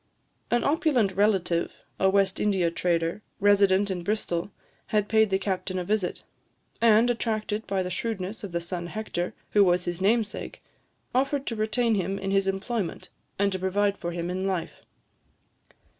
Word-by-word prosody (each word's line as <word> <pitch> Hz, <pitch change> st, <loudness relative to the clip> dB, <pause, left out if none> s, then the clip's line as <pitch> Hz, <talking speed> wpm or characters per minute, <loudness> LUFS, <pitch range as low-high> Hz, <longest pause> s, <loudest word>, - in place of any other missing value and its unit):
An 240 Hz, 0 st, +2 dB
opulent 280 Hz, -, +2 dB
relative, 190 Hz, -4 st, +1 dB, 0.3 s
a 190 Hz, -, +4 dB
West 195 Hz, -1 st, +2 dB
India 190 Hz, -5 st, +2 dB
trader, 170 Hz, +2 st, 0 dB, 0.2 s
resident 200 Hz, -1 st, +4 dB
in 180 Hz, -2 st, -3 dB
Bristol, 175 Hz, -2 st, -1 dB, 0.4 s
had 210 Hz, -1 st, +1 dB
paid 220 Hz, -1 st, +4 dB
the 190 Hz, -, +2 dB
captain 190 Hz, -1 st, -2 dB
a 180 Hz, -, -1 dB
visit; 200 Hz, -1 st, -1 dB, 0.6 s
and, 230 Hz, 0 st, +6 dB
attracted 220 Hz, -2 st, -2 dB
by 195 Hz, -1 st, 0 dB
the 180 Hz, -, -4 dB
shrewdness 205 Hz, +1 st, -3 dB
of 200 Hz, -, -5 dB
the 170 Hz, 0 st, -2 dB
son 170 Hz, 0 st, -4 dB
Hector, 180 Hz, -3 st, -4 dB, 0.2 s
who 205 Hz, -, +6 dB
was 180 Hz, -1 st, +2 dB
his 175 Hz, +1 st, -3 dB
namesake, 215 Hz, +1 st, 0 dB, 0.5 s
offered 275 Hz, +2 st, +1 dB
to 230 Hz, -, -3 dB
retain 220 Hz, +2 st, +1 dB
him 195 Hz, -1 st, -1 dB
in 195 Hz, 0 st, -3 dB
his 195 Hz, 0 st, +2 dB
employment, 195 Hz, -1 st, -3 dB, 0.3 s
and 200 Hz, 0 st, +2 dB
to 190 Hz, -, -2 dB
provide 200 Hz, +2 st, +1 dB
for 175 Hz, -3 st, -4 dB
him 170 Hz, +1 st, -3 dB
in 185 Hz, +1 st, -2 dB
life. 185 Hz, -4 st, -3 dB
195 Hz, 160 wpm, -26 LUFS, 185-215 Hz, 0.6 s, and